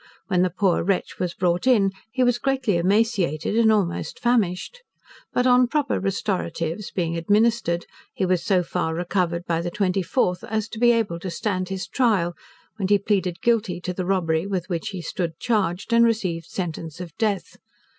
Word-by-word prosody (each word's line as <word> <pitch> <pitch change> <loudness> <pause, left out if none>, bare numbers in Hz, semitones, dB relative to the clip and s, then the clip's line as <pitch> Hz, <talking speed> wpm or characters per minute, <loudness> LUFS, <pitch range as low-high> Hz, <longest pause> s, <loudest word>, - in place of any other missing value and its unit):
When 180 -3 +3
the 185 - +3
poor 185 0 +1
wretch 190 +1 -1
was 180 -1 -2
brought 180 +4 0
in, 205 -7 +4 0.2
he 255 +2 +1
was 245 -1 +2
greatly 265 -7 0
emaciated 190 - +1
and 225 -1 +5
almost 195 -6 -1
famished. 235 - 0 0.5
But 250 - +1
on 250 0 +5
proper 290 +2 0
restoratives 190 -2 -2
being 170 -2 -2
administered, 205 0 +1 0.3
he 190 - 0
was 185 -1 +1
so 185 -3 +2
far 165 -2 -2
recovered 175 0 -1
by 165 -1 0
the 175 - -2
24th, 185 0 0
as 220 0 -2
to 220 - -7
be 240 0 +6
able 220 -8 0
to 185 - -5
stand 185 +1 -2
his 190 -1 -4
trial, 205 -9 +1 0.4
when 195 -3 -1
he 205 +1 +5
pleaded 190 -4 -1
Guilty 220 -7 +1
to 180 - -3
the 180 0 -3
robbery 170 -2 +1
with 185 -2 -3
which 170 -3 -2
he 185 -4 -6
stood 165 0 -3
charged, 205 -2 -1
and 235 0 +6
received 185 -8 0
sentence 165 -3 -5
of 175 -3 -8
death. 210 -3 -1
190 Hz, 175 wpm, -23 LUFS, 175-220 Hz, 0.5 s, be